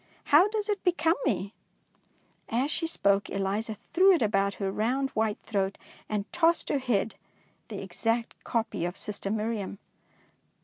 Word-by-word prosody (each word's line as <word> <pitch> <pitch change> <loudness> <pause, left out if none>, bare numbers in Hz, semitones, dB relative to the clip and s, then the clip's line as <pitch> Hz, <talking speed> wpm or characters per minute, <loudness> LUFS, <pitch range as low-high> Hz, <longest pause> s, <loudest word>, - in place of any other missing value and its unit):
How 335 +7 +8
does 420 -1 -2
it 410 -2 -1
become 345 -2 +3
me? 200 -4 -1 0.5
" - - -39 0.2
As 255 +6 +1
she 330 - -1
spoke, 200 -10 +2
Eliza 200 +3 -2 0.2
threw 380 +3 +7
it 330 - +2
about 200 -1 +1
her 195 -2 -2
round 255 +7 0
white 215 -1 0
throat, 195 -2 -1 0.3
and 210 -2 -1
tossed 340 -1 +3
her 285 - +2
head, 230 -4 0 0.5
the 205 -4 -6
exact 225 +5 -2
copy 225 -7 -1
of 175 +1 -3
sister 200 -1 -5
Miriam. 215 -2 -2
220 Hz, 150 wpm, -28 LUFS, 200-285 Hz, 0.5 s, How